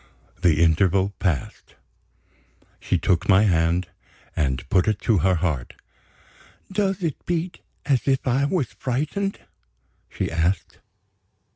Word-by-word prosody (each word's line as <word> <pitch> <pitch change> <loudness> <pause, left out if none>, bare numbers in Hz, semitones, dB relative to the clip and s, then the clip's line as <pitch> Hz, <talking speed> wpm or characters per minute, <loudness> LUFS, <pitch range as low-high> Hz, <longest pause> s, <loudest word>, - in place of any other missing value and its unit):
The 85 -3 +4
interval 95 +4 +2
passed. 85 -10 -3 1.0
She - - 0
took 90 +3 0
my 95 +1 +6
hand, 85 -2 +1 0.5
and 65 -5 -1
put 95 0 +2
it 110 -2 +1
to 110 -5 +2
her 95 +3 +3
heart. 80 -8 -2 1.0
"Does 195 -1 0
it 160 -5 -3
beat 175 0 -2 0.3
as 135 -3 +1
if 135 -1 +1
I 130 +2 +2
was 145 -4 -1
frightened?" 155 +10 -2 0.7
she - - -3
asked. 85 +3 -1
100 Hz, 120 wpm, -23 LUFS, 85-140 Hz, 1.0 s, my